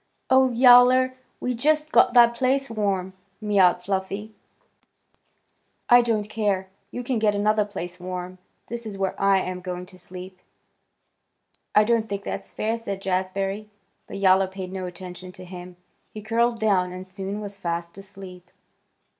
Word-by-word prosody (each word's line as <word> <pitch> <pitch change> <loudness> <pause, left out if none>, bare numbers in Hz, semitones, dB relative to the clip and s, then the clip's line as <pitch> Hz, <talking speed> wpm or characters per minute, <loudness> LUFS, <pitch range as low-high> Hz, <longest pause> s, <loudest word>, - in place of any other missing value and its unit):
"Oh, 260 0 +6
Yowler! 250 +1 +6 0.3
We 250 - -2
just 305 +5 +1
got 245 - +4
that 235 -1 +7
place 265 +2 0
warm!" 195 -4 -1 0.3
mewed 195 -4 +3
Fluffy. 195 +3 -3 1.6
"I 245 0 +8
don't 220 -3 -1
care! 205 -3 -1 0.2
You 245 - -6
can 245 -1 -1
get 210 -1 +2
another 210 +1 +2
place 180 -3 -7
warm. 180 0 -6 0.3
This 235 0 -6
is 200 -2 -7
where 195 -1 -1
I 195 0 +4
am 180 0 -5
going 180 0 -5
to 185 0 -16
sleep." 185 +1 -10 1.4
"I 210 - +7
don't 225 0 +1
think 200 0 -4
that's - - -5
fair!" 225 +2 -2
said 200 -4 -5
Jazbury. 195 +2 -2 0.4
But - - -7
Yowler 190 -1 +4
paid 190 -1 -7
no 185 -1 -4
attention 180 0 -9
to 185 - -11
him. 180 0 -10 0.3
He 215 - -9
curled 230 +1 +1
down 190 -4 +2
and 185 +1 -8
soon 195 +2 -6
was 200 -1 -8
fast 170 -1 -4
asleep. 190 -2 -11
195 Hz, 155 wpm, -24 LUFS, 185-225 Hz, 1.6 s, I